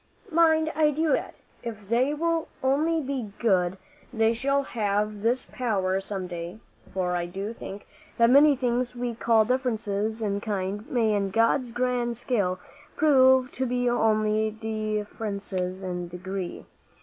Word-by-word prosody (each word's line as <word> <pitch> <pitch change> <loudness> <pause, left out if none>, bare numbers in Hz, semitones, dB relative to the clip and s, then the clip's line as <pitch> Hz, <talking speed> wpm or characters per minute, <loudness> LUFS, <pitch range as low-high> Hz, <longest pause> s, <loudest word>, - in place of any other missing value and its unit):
Mind, 320 -1 +4
I 305 0 +4
do 305 0 +1
expect - - -2 0.3
that, 235 - -2
if 210 -3 -11
they 245 +6 +2
will 330 +2 0 0.2
only 310 +5 +2
be 260 -7 -4
good, 190 -5 +2 0.3
they 225 -1 +2
shall 275 +4 +1
have 210 -3 -1
this 240 +4 +1
power 195 -6 0
some 195 -1 -4
day; 175 +2 -6 0.3
for 180 -2 -1
I 175 0 -1
do 195 +5 -5
think 200 -3 -8 0.3
that 235 0 +5
many 285 +2 +7
things 250 -1 -1
we 240 -1 -2
call 225 -1 +3
differences 220 -3 -1
in 200 -1 -1
kind, 205 0 -3
may 225 -4 +2
in 200 -1 0
God's 230 +4 +2
grand 240 -1 -1
scale 205 -7 0 0.4
prove 260 -4 +5
to 260 0 -2
be 245 0 0
only 215 -2 +2
differences 210 -3 -3
in 180 -1 -4
degree. 185 +1 -6
225 Hz, 150 wpm, -26 LUFS, 200-255 Hz, 0.4 s, many